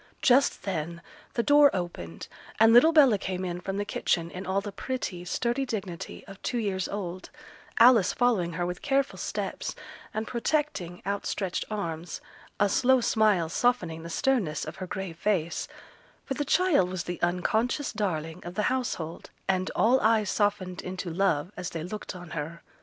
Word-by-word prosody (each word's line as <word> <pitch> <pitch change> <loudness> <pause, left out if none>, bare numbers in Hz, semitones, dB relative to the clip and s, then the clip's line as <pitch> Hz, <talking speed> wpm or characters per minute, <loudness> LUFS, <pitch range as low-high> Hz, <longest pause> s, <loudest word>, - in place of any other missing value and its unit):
Just 265 +2 +4
then 170 -3 -3 0.3
the 235 - +1
door 290 +1 +7
opened, 170 - -5 0.3
and 225 +1 +7
little 250 +8 +8
Bella 275 -10 +6
came 185 -1 -3
in 175 0 -4
from 195 +2 -3
the 205 - -1
kitchen 170 -4 0
in 180 +1 -7
all 190 +1 +1
the 200 +1 -6
pretty, 200 -5 -4
sturdy 240 +8 0
dignity 200 -9 -5
of 195 -1 -12
two 245 - -2
years 195 -5 -1
old, 185 -2 -5 0.5
Alice 230 -6 +7
following 220 -9 +1
her 175 +1 -1
with 180 0 -4
careful 275 -1 0
steps, - - -3 0.4
and 220 +1 -3
protecting, 235 - -2
outstretched 200 -1 -2
arms, 170 -5 -4 0.4
a 205 - +5
slow 260 +6 +4
smile 215 -7 +3
softening 175 -5 0
the 165 - -8
sternness 195 - 0
of - - -7
her 185 - -5
grave 180 -3 -5
face; 175 -6 0 0.6
for 270 - -2
the 290 +2 -2
child 315 - +3
was 185 -2 -3
the 175 0 -5
unconscious 220 +10 0
darling 170 -5 -2
of 175 +1 -7
the 210 - 0
household, 180 -11 -3 0.2
and 185 0 +1
all 245 +4 +4
eyes 220 -2 +3
softened 200 -3 0
into 185 -1 -5
love 175 -2 +1
as 180 0 -4
they 165 -2 -5
looked 200 +2 -6
on 175 -3 -10
her. 165 +1 -5
195 Hz, 170 wpm, -28 LUFS, 175-235 Hz, 0.6 s, little